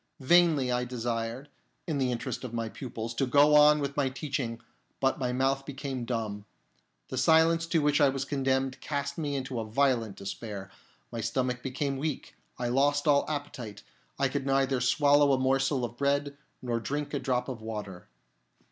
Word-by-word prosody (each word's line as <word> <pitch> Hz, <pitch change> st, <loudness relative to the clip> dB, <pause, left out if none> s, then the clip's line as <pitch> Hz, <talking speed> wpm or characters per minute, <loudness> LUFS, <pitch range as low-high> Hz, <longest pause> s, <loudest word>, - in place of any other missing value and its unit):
Vainly 150 Hz, -2 st, +4 dB
I 125 Hz, 0 st, +1 dB
desired, 120 Hz, +1 st, -3 dB, 0.4 s
in 155 Hz, -5 st, -2 dB
the 130 Hz, -2 st, +1 dB
interest 120 Hz, +2 st, -4 dB
of 120 Hz, -2 st, -6 dB
my 115 Hz, -1 st, -2 dB
pupils, 115 Hz, -2 st, -6 dB
to 130 Hz, +3 st, 0 dB
go 145 Hz, +3 st, +5 dB
on 150 Hz, 0 st, +7 dB
with 140 Hz, -1 st, -3 dB
my 140 Hz, -2 st, +1 dB
teaching, 130 Hz, -4 st, -3 dB, 0.4 s
but 135 Hz, +2 st, +1 dB
my 125 Hz, -2 st, -1 dB
mouth 135 Hz, +2 st, +1 dB
became 135 Hz, -3 st, -5 dB
dumb. 110 Hz, -4 st, -3 dB, 0.6 s
The 130 Hz, -, -2 dB
silence 165 Hz, +3 st, +4 dB
to 165 Hz, -2 st, +1 dB
which 145 Hz, +1 st, +3 dB
I 145 Hz, -, +6 dB
was 135 Hz, 0 st, -2 dB
condemned 135 Hz, -2 st, -1 dB
cast 140 Hz, 0 st, -3 dB
me 145 Hz, -3 st, -2 dB
into 130 Hz, -2 st, -3 dB
a -, -, -2 dB
violent 115 Hz, -2 st, +1 dB
despair; 100 Hz, -1 st, -7 dB, 0.4 s
my 115 Hz, -, -4 dB
stomach 125 Hz, +2 st, -1 dB
became 135 Hz, +1 st, -2 dB
weak; 150 Hz, +1 st, -4 dB, 0.2 s
I 125 Hz, -, -2 dB
lost 145 Hz, +4 st, +2 dB
all 140 Hz, -1 st, +3 dB
appetite; 140 Hz, -8 st, -5 dB, 0.3 s
I -, -, +2 dB
could 140 Hz, -1 st, -3 dB
neither 135 Hz, -1 st, +2 dB
swallow 145 Hz, +2 st, +4 dB
a -, -, +3 dB
morsel 135 Hz, 0 st, +1 dB
of 120 Hz, 0 st, -8 dB
bread 140 Hz, +1 st, 0 dB, 0.3 s
nor 120 Hz, -2 st, -1 dB
drink 145 Hz, +6 st, -3 dB
a 140 Hz, -, 0 dB
drop 125 Hz, -2 st, -1 dB
of 125 Hz, -4 st, -6 dB
water. 105 Hz, -5 st, -6 dB
135 Hz, 175 wpm, -29 LUFS, 120-145 Hz, 0.6 s, on